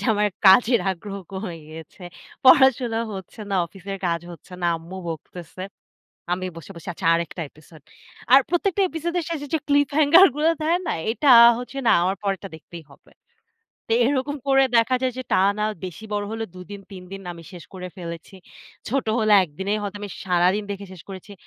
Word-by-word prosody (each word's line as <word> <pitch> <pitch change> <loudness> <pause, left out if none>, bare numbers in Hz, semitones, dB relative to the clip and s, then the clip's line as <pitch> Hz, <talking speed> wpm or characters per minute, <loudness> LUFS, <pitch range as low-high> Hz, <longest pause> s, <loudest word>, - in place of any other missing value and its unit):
যে, - - +5
আমার 210 0 +2 0.2
কাজের 230 +5 +6
আগ্রহ 195 +2 -6 0.2
কমে 190 -3 -5 0.2
গেছে, 160 +4 -12 0.4
পড়াশোনা 255 -4 +5
হচ্ছে 190 +3 -9
না, - - 0
অফিসের 195 +3 -8
কাজ 170 -1 0
হচ্ছে 170 +2 -15
না, - - +2
আম্মু 165 +3 -10
বকতেছে। 170 +2 -8 0.7
আমি 185 +1 -2
বসে 165 +3 -11
বসে, 170 - -10
আচ্ছা 165 - -5
আরেকটা 170 +1 -3
এপিসোড। 155 +1 -18 0.5
আর 270 - +9
প্রত্যেকটা 365 +4 +1
এপিসোডের 340 +1 -3
শেষে 295 -3 -4
যে - - +3
ক্লিপ 285 -1 +3
হ্যাঙ্গার 310 +5 +7
গুলো 310 +2 +3
দেয় 335 +3 +2
না? - - 0 0.2
এটা 275 +5 0 0.3
হচ্ছে 250 +2 -7
না - - +6
,আমার 190 +2 0
পরেরটা 195 -1 -3
দেখতেই 160 +1 -11
হবে। - - -22 0.8
তো - - +2
এরকম 285 +1 -1
করে 270 -1 +4
দেখা 230 +3 +3
যায় 255 -1 0
যে, - - -3
টানা 200 +3 +2 0.2
বেশি 185 +3 -8
বড় 205 0 -1
হলেও 225 0 -4
দুদিন 190 +2 -9
তিনদিন 190 +1 -9
আমি 170 -1 -12
শেষ 175 -3 -10
করে 180 -1 -7
ফেলেছি। 170 0 -8 0.5
ছোট 270 +4 0
হলে, 215 -2 +2
একদিনে 190 +5 -5
হয়তো 205 0 -5
আমি 205 - -6 0.2
সারাদিন 180 +3 +2
দেখে 200 0 -6
শেষ 180 -3 -12
করেছি। 195 +1 -10
200 Hz, 175 wpm, -23 LUFS, 180-260 Hz, 0.8 s, আর